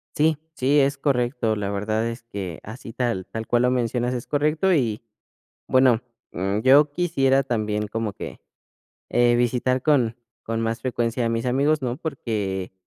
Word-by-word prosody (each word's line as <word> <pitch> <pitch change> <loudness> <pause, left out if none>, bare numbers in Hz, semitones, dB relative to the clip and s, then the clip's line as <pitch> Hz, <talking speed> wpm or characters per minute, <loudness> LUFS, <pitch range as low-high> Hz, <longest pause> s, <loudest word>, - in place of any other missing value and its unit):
Sí, 155 0 +3 0.2
sí, 140 +3 +3
es 140 +1 +1
correcto, 125 -5 0
la 100 -1 -3
verdad 110 +3 -1
es 115 +1 -5
que 100 -7 -6
así 115 +2 -9
tal 115 -6 -2
tal 110 0 -5
cual 120 0 +2
lo 125 - +3
mencionas 125 0 0
es 120 -2 -5
correcto 155 +6 +2
y, 115 -9 0 0.7
bueno, 130 -3 +4 0.3
mm, 95 +4 -1
yo 145 +4 +5
quisiera 135 -6 +2
también 105 -4 -2
como 110 -1 -3
que, - - -8 0.7
eh, 120 0 +4
visitar 125 +1 +1
con 125 -7 +2 0.3
con 115 0 -3
más 115 0 -2
frecuencia 120 -1 -1
a - - +1
mis 115 0 -1
amigos, 140 +4 +2
¿no? 125 -1 -2
Porque 105 - -3
120 Hz, 165 wpm, -23 LUFS, 110-135 Hz, 0.7 s, yo